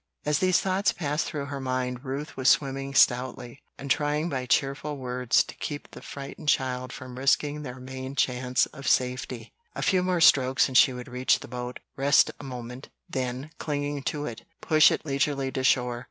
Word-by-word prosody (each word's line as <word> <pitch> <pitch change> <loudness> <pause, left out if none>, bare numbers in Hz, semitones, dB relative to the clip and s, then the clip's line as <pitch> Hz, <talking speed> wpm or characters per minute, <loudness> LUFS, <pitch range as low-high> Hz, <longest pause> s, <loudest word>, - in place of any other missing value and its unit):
As 150 -1 +1
these 185 -2 +3
thoughts 190 +1 +1
passed 150 -1 -2
through 145 -4 -4
her 140 -1 -5
mind 130 -1 -2
Ruth 140 +3 -5
was 130 0 +3
swimming 135 -1 +1
stoutly, 125 0 +2 0.2
and 140 0 -4
trying 150 +4 +1
by 130 -4 -3
cheerful 140 +3 0
words 125 -1 +1
to - - -10
keep 145 -1 -6
the - - -11
frightened 140 +2 -6
child 130 -1 0
from 130 -1 -9
risking 145 +2 +1
their 130 -3 -7
main 130 +1 -7
chance 125 -2 +1
of 140 -3 -10
safety. 125 -1 -1 0.2
A - - -3
few 185 -1 +3
more 180 -1 0
strokes 130 -4 +5
and 130 - -8
she 130 - +7
would 125 -1 -7
reach 125 +1 +1
the - - -9
boat, 125 0 -6
rest 140 0 +4
a - - -9
moment, 125 -1 -8 0.2
then, 130 -1 -4
clinging 145 -1 -2
to 150 -1 -2
it, 115 -4 -6 0.2
push 155 -1 +5
it - - -3
leisurely 140 -1 0
to 130 - -3
shore. 125 -2 +2
135 Hz, 185 wpm, -27 LUFS, 125-145 Hz, 0.2 s, she